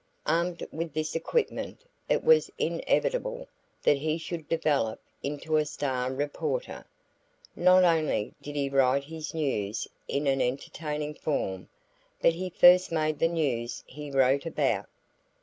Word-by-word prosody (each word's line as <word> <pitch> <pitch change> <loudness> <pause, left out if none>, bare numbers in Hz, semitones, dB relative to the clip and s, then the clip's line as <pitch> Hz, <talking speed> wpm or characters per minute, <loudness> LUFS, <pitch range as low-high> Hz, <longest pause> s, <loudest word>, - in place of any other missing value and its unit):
Armed 170 +2 0
with 160 0 -5
this 155 0 -1
equipment, 455 - -1 0.3
it - - +2
was 475 0 +5
inevitable - - 0 0.4
that 145 - +4
he 155 +2 0
should 165 -2 -6
develop 145 -9 +1 0.2
into 150 +2 -1
a 155 - +3
star 130 -4 -2
reporter. 145 - -3 0.7
Not 185 +1 +6
only 160 -11 +2
did 145 0 -7
he 140 -1 0
write 135 0 +3
his 160 +1 -7
news 110 -9 -1 0.2
in 140 +1 -1
an 135 -1 +2
entertaining 150 +4 -3
form, 95 -12 -3 0.5
but - - +4
he 185 +2 -4
first 180 +1 +6
made 155 -2 0
the 165 - +4
news 130 -8 -2
he 150 +2 -9
wrote 135 +2 +3
about. - - 0
150 Hz, 135 wpm, -28 LUFS, 140-165 Hz, 0.7 s, Not